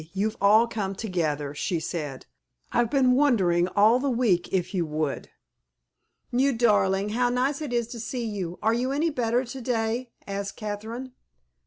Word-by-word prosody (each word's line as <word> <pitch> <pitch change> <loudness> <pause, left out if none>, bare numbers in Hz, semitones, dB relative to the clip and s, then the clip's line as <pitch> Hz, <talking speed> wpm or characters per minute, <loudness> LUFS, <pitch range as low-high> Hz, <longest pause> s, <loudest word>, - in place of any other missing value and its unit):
You've 210 +3 -1
all 215 +3 +6
come 205 -4 -3
together," 155 -9 -2
she 170 +4 -2
said. 150 -4 -5 0.5
"I've 240 -1 +2
been 260 -2 +3
wondering 200 -11 +3
all 215 +4 +5
the 280 +1 0
week 230 -8 +1
if 185 +1 -1
you 180 -3 +1
would." 155 -2 -3 1.0
"You 265 +3 +2
darling, 205 -4 +2
how 245 +3 +1
nice 265 +4 0
it 295 -4 -4
is 240 -1 +1
to 235 -1 -7
see 235 +2 -4
you! 190 -5 -4
Are 220 +1 +3
you 250 +3 0
any 310 +4 +1
better 245 -1 0
to 260 +2 -7
day?" 235 0 -1 0.2
asked 200 0 -4
Catherine. 220 +4 -6
225 Hz, 165 wpm, -26 LUFS, 190-245 Hz, 1.0 s, all